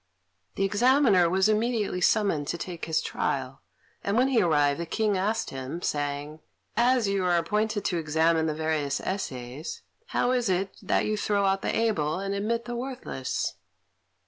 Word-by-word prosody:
The 195 - 0
Examiner 205 -3 +4
was 190 +2 +3
immediately 215 -3 0
summoned 180 -8 +2
to 170 - -2
take 170 0 -5
his 160 -1 0
trial, 135 -1 -2 0.4
and 200 +2 0
when 255 +2 +4
he 245 -5 +3
arrived 145 -4 +2
the 170 - -3
King 215 +3 +1
asked 210 +4 -1
him, 135 +5 -5
saying, 145 +1 -2 0.4
"As 240 -1 +3
you 195 -1 0
are 175 -1 +3
appointed 210 +4 0
to 175 - 0
examine 160 +1 +2
the 155 - -1
various 155 -3 -1
essays, 135 -6 -5 0.2
how 245 - +1
is 245 -4 +1
it 190 +1 0
that - - +1
you 215 0 0
throw 205 -1 +1
out 195 0 +1
the - - -1
able 170 -9 +1
and 195 0 -3
admit 230 +4 -1
the 240 - -4
worthless?" 245 - -3
190 Hz, 170 wpm, -27 LUFS, 155-215 Hz, 0.4 s, Examiner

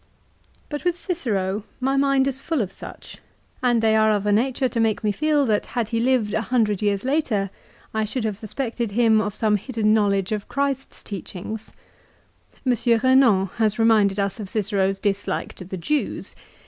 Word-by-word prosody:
But 295 -1 -5
with 355 -1 +1
Cicero 210 - -2 0.2
my 265 +1 +1
mind 275 -1 +3
is 270 0 -2
full 320 -8 0
of 190 - -6
such, - - -11 0.4
and 240 -3 +2
they 220 0 +4
are 220 0 +4
of 205 -1 +1
a 205 - +2
nature 255 +5 +2
to 240 - -3
make 225 -1 +1
me 210 - +2
feel 295 +4 +2
that 215 -4 0
had 230 -3 0
he 230 - 0
lived 240 -4 +1
a 220 - +1
hundred 220 -4 +1
years 205 -1 0
later 255 -9 0 0.4
I 220 0 0
should 235 +3 -3
have 215 -2 -1
suspected 225 +1 -3
him 225 -1 +4
of 210 -1 -2
some 215 -2 +2
hidden 215 -1 0
knowledge 200 -3 +2
of 210 -1 -2
Christ's 275 -1 -2
teachings. 205 +2 -7 1.0
M. 255 - +4
Eenan 235 -4 +3
has 215 -2 +1
reminded 215 -3 +4
us 200 +1 -1
of 200 -3 -5
Cicero's 195 -2 0
dislike 200 0 -2
to 185 - -10
the 190 +1 -6
Jews. 285 - -2
220 Hz, 180 wpm, -23 LUFS, 205-255 Hz, 1.0 s, they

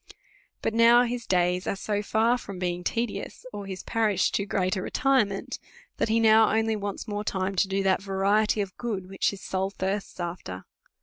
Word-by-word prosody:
But - - 0
now 235 +1 +6
his 245 -1 -3
days 180 0 +1
are - - 0
so 205 +1 -2
far 220 +3 +2
from 200 -5 -8
being 180 -1 -2
tedious, 230 +5 -3
or 205 -1 -6
his 190 -1 -6
parish 215 -4 +1
too 200 - -1
great 185 -1 0
a 190 - -2
retirement, 230 -5 0 0.4
that - - 0
he 225 +1 +3
now 220 -1 +6
only 220 0 +1
wants 205 +1 -5
more 205 -1 -3
time 190 -1 -1
to 195 - +3
do 195 0 -1
that 190 0 +2
variety 200 +2 +1
of 190 -2 -5
good 205 -6 -4
which 195 0 0
his 200 - -7
soul 190 0 -1
thirsts 195 0 -4
after. 170 - -5
200 Hz, 190 wpm, -26 LUFS, 190-220 Hz, 0.4 s, now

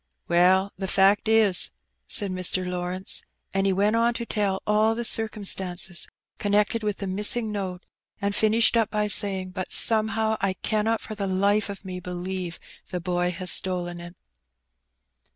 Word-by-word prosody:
"Well, 185 +3 +3
the 190 - -3
fact 195 +3 +3
is, 220 -4 +3 0.4
said 200 -2 +2
Mr. 185 0 +1
Lawrence, 180 +1 -2 0.3
and 195 0 +1
he - - +2
went 205 +3 +1
on 235 +1 +2
to 235 - -4
tell 200 -4 -1
all 215 +1 +2
the 235 +1 -4
circumstances 190 -6 +1 0.3
connected 210 +2 +1
with 210 -2 -2
the 200 - -5
missing 210 +4 +1
note, 190 -3 -5 0.3
and 200 -1 -1
finished 220 +2 +4
up 225 -3 +2
by 210 -1 -1
saying, 195 -2 +1
"But 185 0 -5
somehow 220 0 +2
I 195 -1 +1
cannot 220 +3 -1
for - - -7
the 200 -2 -4
life 200 +3 +1
of 200 0 -8
me 185 -1 -6
believe 180 0 -5 0.3
the 180 - -3
boy 175 0 -1
has 180 0 +2
stolen 175 -2 -1
it. 175 +1 -10
195 Hz, 160 wpm, -25 LUFS, 185-215 Hz, 0.4 s, finished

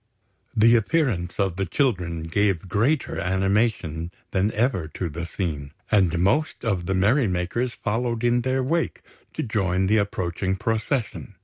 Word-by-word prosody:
The 115 +2 +6
appearance 110 - 0
of 95 -3 0
the 95 - 0
children 90 - 0
gave 95 +2 0
greater 115 - +1
animation 95 -3 0 0.2
than 100 +3 +1
ever 105 -7 +1
to 90 - -2
the 85 +3 -5
scene; 75 -7 -4 0.2
and 95 -5 +3
most 120 - +1
of 95 -6 -1
the 95 - +1
merry 110 +7 +3
makers 95 +7 -1
followed 115 +1 -2
in 120 0 +3
their 130 +1 0
wake 165 +5 -1 0.3
to - - -2
join 95 -5 0
the 105 +3 +3
approaching 95 -2 -1
procession. 110 0 -2
100 Hz, 145 wpm, -24 LUFS, 90-120 Hz, 0.3 s, The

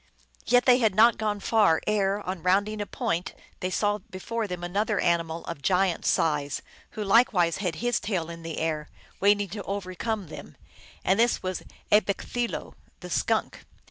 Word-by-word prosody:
Yet 245 +1 +4
they 250 0 +6
had 220 -5 +2
not 230 +2 +5
gone 210 -1 -1
far 205 -6 +3
ere, 205 -1 +1
on 185 -3 -5
rounding 205 +4 +1
a 205 - -4
point, 170 +2 -2 0.2
they 185 - -2
saw 205 +2 0
before 220 +4 -5
them 180 -2 -5
another 205 +4 0
animal 170 -1 0
of 165 -4 -6
giant 185 +1 +1
size, 145 -3 +1 0.3
who 215 - -1
likewise 195 -5 +3
had 180 -5 -2
his 240 +4 0
tail 185 -6 -2
in 165 0 -9
the 165 -1 -6
air, 155 -2 -2 0.3
waiting 205 0 +3
to 205 +3 -5
overcome 200 0 -4
them, - - -10 0.5
and 190 +3 +3
this 235 +1 +2
was 185 0 -3 0.3
A 210 - +7
bekk 200 - -4
thee 245 -1 +1
lo - - -6
(M.), - - -21 0.3
the - - -8
Skunk. - - 0
195 Hz, 180 wpm, -27 LUFS, 175-215 Hz, 0.5 s, A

